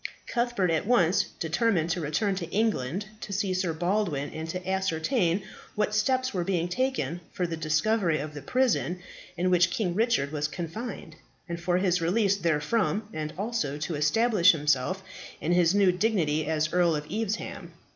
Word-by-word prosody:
Cuthbert 235 -7 0
at 160 +4 0
once 190 -7 +3
determined 170 0 +1
to 170 - -1
return 160 +7 0
to 180 -3 -4
England 200 - 0
to 210 - -7
see 195 -1 0
Sir 185 -2 0
Baldwin, 175 -3 -1
and 160 +1 -6
to 180 +2 -5
ascertain 190 - 0 0.3
what 210 0 0
steps 255 +4 +1
were 180 -3 0
being 175 -2 0
taken 250 -4 -1
for 180 - -1
the 170 -1 -3
discovery 165 +3 +1
of 150 +1 -5
the 145 - -7
prison 230 - +1 0.4
in 180 +1 +1
which 175 -1 +4
King 180 -1 -1
Richard 200 - +1
was 150 -1 -1
confined, 170 +1 -6 0.3
and 170 0 -5
for 175 0 +1
his 180 -2 +1
release 195 +4 +2
therefrom; 200 +6 0
and 155 -1 -4
also 200 -9 -2
to 150 +3 -3
establish 185 +6 +4
himself 150 +5 0 0.4
in 165 - -1
his 175 +1 +4
new 200 -2 +5
dignity 175 -7 0
as 155 -1 0
Earl 175 -2 +3
of 150 0 -4
Evesham. 220 0 -3
180 Hz, 165 wpm, -27 LUFS, 160-210 Hz, 0.4 s, new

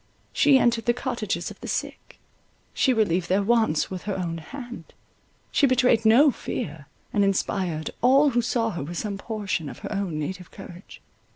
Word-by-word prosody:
She 285 -2 +5
entered 235 -2 +1
the 240 - +3
cottages 235 -9 -3
of - - -13
the - - -7
sick; - - -5 0.6
she 265 - +2
relieved 185 -7 +1
their 195 +2 +2
wants 220 -8 +2
with 185 0 -6
her 195 - -1
own 170 -3 -3
hand; 240 - -10 0.6
she 280 - +4
betrayed 245 -3 +3
no 270 +7 +6
fear, 150 - -6 0.3
and 205 - +3
inspired 185 -5 -1
all 275 +4 +5
who 240 0 +2
saw 230 -1 0
her 170 - -5
with 170 +4 -6
some 200 0 -3
portion 200 -8 -3
of - - -9
her - - -5
own 195 -6 -2
native 180 +4 -5
courage. 180 +1 -12
205 Hz, 175 wpm, -25 LUFS, 175-240 Hz, 0.6 s, no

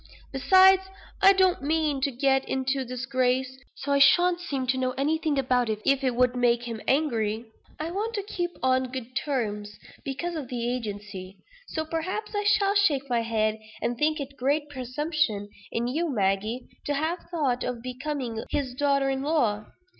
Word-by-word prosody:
Besides, 375 +7 +6 0.4
I 390 - +9
don't 375 -4 +3
mean 300 -1 0
to 280 - +2
get 270 +1 +1
into 265 +1 0
disgrace; 255 +1 -1 0.2
so 285 +1 -4
I 280 - +4
shan't 350 +5 +5
seem 280 -7 -3
to 260 +1 +1
know 255 0 0
anything 305 +1 0
about 250 -3 +2
it, 215 -1 -1
if 275 0 +3
it 255 -2 +1
would 250 0 +3
make 240 -1 +2
him 230 -2 -5
angry. 230 -6 +1 0.3
I 320 +2 -3
want 435 +5 -2
to 405 - -2
keep 350 -3 -3
on 260 -1 +2
good 255 -1 -7
terms, 210 -7 -2 0.3
because 295 +6 -3
of 305 -6 -5
the 240 0 -2
agency. 205 -4 -7 0.3
So, 315 0 -3
perhaps, 370 +8 -3
I 415 0 -1
shall 405 -1 +3
shake 300 -10 +2
my 235 -1 +2
head, 220 -1 0 0.2
and 240 - -1
think 305 +4 +1
it 280 0 -7
great 290 +3 0
presumption 260 -4 -1 0.2
in 230 - -1
you, 315 +7 -1
Maggie, 215 +1 0 0.2
to 290 - +1
have 320 +5 -1
thought 285 -8 0
of 245 -2 -4
becoming 255 -3 -4
his 265 -3 -2
daughter 275 0 +2
in 265 0 -2
law. 240 -9 +1
265 Hz, 175 wpm, -26 LUFS, 240-310 Hz, 0.4 s, I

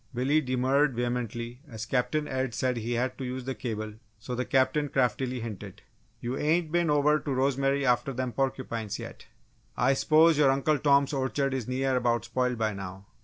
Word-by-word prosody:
Billy 140 +5 +2
demurred 130 +1 +1
vehemently 120 0 -3
as 110 -2 -6
Captain 140 +5 0
Ed 130 -2 -2
said 130 -1 0
he 115 +1 -2
had 125 +2 -1
to - - -4
use 130 0 -4
the 135 - -2
cable 110 -4 -4 0.2
so 115 +4 -7
the 125 +1 -2
Captain 135 +3 +2
craftily 125 -1 0
hinted: 105 -4 -8 0.4
"You 120 +2 -3
ain't 160 +1 +1
been 170 -1 +2
over 150 +1 +3
to 145 - -4
Rosemary 135 +1 +1
after 125 +3 +2
them 130 -1 -3
porcupines, 120 -5 -2
yet? - - -9 0.5
I 130 +2 +3
s'pose 155 +3 +4
your 145 -2 +5
Uncle 140 +2 +2
Tom's 140 0 +3
orchard 135 0 0
is 130 -4 -3
near 130 +1 0
about 120 -2 +1
spoiled 125 +1 -1
by 110 -1 0
now!" 95 0 -8
130 Hz, 180 wpm, -28 LUFS, 120-140 Hz, 0.5 s, your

